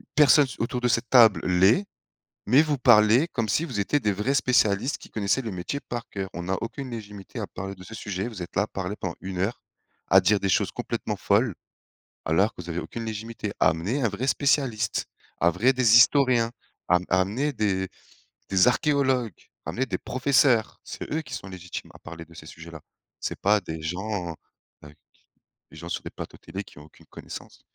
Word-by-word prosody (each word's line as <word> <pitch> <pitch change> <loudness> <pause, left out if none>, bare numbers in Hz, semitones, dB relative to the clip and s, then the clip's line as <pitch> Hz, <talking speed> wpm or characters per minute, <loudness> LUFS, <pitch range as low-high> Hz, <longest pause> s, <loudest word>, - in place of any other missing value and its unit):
«personne 145 -1 +6
s 125 - -10
autour 120 +2 -2
de 125 - +2
cette 115 0 0
table 115 -5 +6
l'est, 95 - +4 0.6
mais 130 +8 +6
vous 150 -3 -1
parlez 120 +4 +5
comme 115 -7 -2
si 155 +10 +1
vous 120 -9 -3
étiez 145 +9 +1
des 105 -4 +1
vrais 105 +8 -1
spécialistes 125 -2 +2
qui - - -14
connaissaient 105 +4 0
le 115 - -4
métier 90 +10 -4
par 120 -1 -6
cœur. 95 -1 -5
On 85 - -5
n'a 95 +2 -1
aucune 130 +3 -5
légitimité 105 -4 -8
à - - -3
parler 95 +1 -7
de 95 0 -13
ce 110 - -11
sujet, 100 0 -4
vous 105 -6 -7
êtes 85 - -10
là 100 - +4
à - - -2
parler 95 0 -5
pendant 85 -3 -4
1 95 -1 -6
heure, 100 +6 -1 0.5
à 95 - +7
dire 100 +2 +3
des 100 - 0
choses - - +2
complètement - - -3
folles. - - +1 0.7
Alors 95 +7 +2
que 90 - -8
vous 85 - -12
avez 85 - -3
aucune 115 - -6
légitimité. 110 0 -5
Amenez 100 - +1
un 115 - +3
vrai 105 +6 -4
spécialiste, 135 -5 +1 0.3
un 85 - +4
vrai 120 +10 +3
des 120 -3 +5
historiens, 120 -3 +4 0.4
a 90 - +5
amenez 105 +11 +1
des 95 -5 -1 0.6
des 95 +2 +4
archéologues, 130 - +1 0.3
amenez 130 - -2
des 95 - -2
professeurs, 130 -3 +2
c'est - - -8
eux 160 - 0
qui 130 -2 -11
sont 95 - -8
légitimes 90 -1 -8
à - - -13
parler 85 +1 -10
de 85 - -18
ces 75 - -11
sujets 85 +1 -11
là. 80 -3 -10 0.4
C'est - - -4
pas 105 +1 +3
des 80 -2 -6
gens, 90 +2 -3
heu, - - -9 0.5
qui 75 - -18 0.8
des - - -13
gens 85 - -8
sur - - -3
des - - -6
plateaux - - -9
télé, 100 +1 -7
qui 80 - -16
ont 75 - -13
aucune 80 - -20
connaissance - - -10
105 Hz, 205 wpm, -25 LUFS, 95-125 Hz, 0.8 s, à